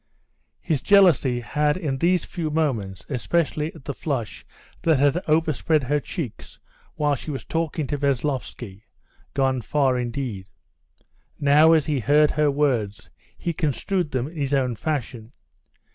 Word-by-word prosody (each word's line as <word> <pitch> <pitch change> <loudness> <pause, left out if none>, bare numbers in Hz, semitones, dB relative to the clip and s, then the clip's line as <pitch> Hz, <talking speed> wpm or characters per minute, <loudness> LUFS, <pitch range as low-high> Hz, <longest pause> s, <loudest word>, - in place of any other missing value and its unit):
His 155 -7 -1
jealousy 160 -11 +4
had 150 +7 0
in 145 -7 -3
these 175 +1 +2
few 165 -4 -4
moments, 120 - -2
especially 150 +5 -1
at 150 - -14
the 140 - -3
flush 135 -6 -4 0.4
that 160 -3 +3
had 145 +5 +2
overspread 155 -1 +2
her 145 +4 +1
cheeks 140 - -7 0.4
while 150 -1 +1
she 140 - -5
was 135 -3 -5
talking 160 -2 -2
to 145 +1 -3
Veslovsky, 130 -7 -2 0.5
gone 130 -2 +1
far 130 0 +1
indeed. 120 -6 -4 0.9
Now 150 +3 +6
as 155 -3 +3
he 150 -3 0
heard 150 +5 +4
her 150 -1 +2
words, 130 -8 -1 0.3
he 170 - -3
construed 165 +3 -1
them 130 -1 -2
in 165 +2 -11
his 140 -1 0
own 130 -3 +1
fashion. 120 -3 -4
145 Hz, 145 wpm, -23 LUFS, 130-155 Hz, 0.9 s, Now